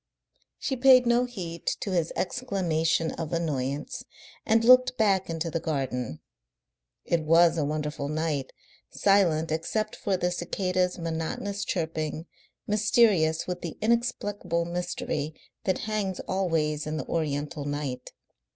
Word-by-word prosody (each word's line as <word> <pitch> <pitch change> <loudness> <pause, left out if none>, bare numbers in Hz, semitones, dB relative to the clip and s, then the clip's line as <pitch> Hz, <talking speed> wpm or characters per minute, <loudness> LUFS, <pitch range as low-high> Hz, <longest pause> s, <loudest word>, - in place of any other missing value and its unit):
She 270 - -2
paid 255 0 +6
no 240 +1 +3
heed 175 -9 -7
to 200 - -3
his 170 -3 0
exclamation 170 -8 0
of 160 -2 -5
annoyance, 145 -4 -2 0.4
and 225 0 +4
looked 255 +1 +6
back 195 -5 +2
into 165 0 -2
the 165 - -1
garden. 130 - -3 0.8
It 170 -1 +1
was 165 +2 +5
a 160 - 0
wonderful 150 -1 -3
night, 155 -3 -2 0.4
silent 170 -6 +3
except 215 +7 -1
for 195 -2 -1
the 180 0 0
cicadas' 180 +1 -1
monotonous 170 +4 -3
chirping, 160 -4 -2 0.4
mysterious 210 -6 +3
with 180 -1 -4
the 170 - -6
inexplicable 205 -7 0
mystery 170 -3 -3 0.3
that 185 - 0
hangs 210 -4 -2
always 160 -5 -1
in 155 +1 -2
the - - -4
Oriental 150 -1 -2
night. 145 -3 -4
170 Hz, 125 wpm, -27 LUFS, 155-200 Hz, 0.8 s, paid